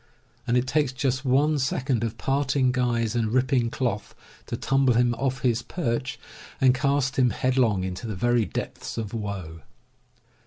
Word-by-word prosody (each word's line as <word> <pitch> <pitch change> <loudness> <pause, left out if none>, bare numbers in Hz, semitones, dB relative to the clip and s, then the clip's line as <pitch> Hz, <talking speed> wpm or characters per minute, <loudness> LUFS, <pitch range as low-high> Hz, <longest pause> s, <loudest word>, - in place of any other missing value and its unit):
And 120 +1 +3
it 125 - +1
takes 145 0 +1
just 130 -1 -1
one 145 +3 +2
second 130 -2 0
of 115 0 -3
parting 135 0 +1
guys 120 -3 0
and 115 -2 0
ripping 130 -1 +2
cloth 115 -5 -3 0.3
to - - -3
tumble 135 -2 +2
him 120 0 +3
off 130 +2 -2
his 120 -2 +2
perch 130 -4 -3 0.4
and 130 -1 +5
cast 135 0 0
him 125 -1 +5
headlong 120 -7 +1
into 95 +5 -4
the 105 - -4
very 120 +3 +2
depths - - -5
of 110 -2 -4
woe. 95 -7 -5
125 Hz, 160 wpm, -25 LUFS, 115-135 Hz, 0.4 s, and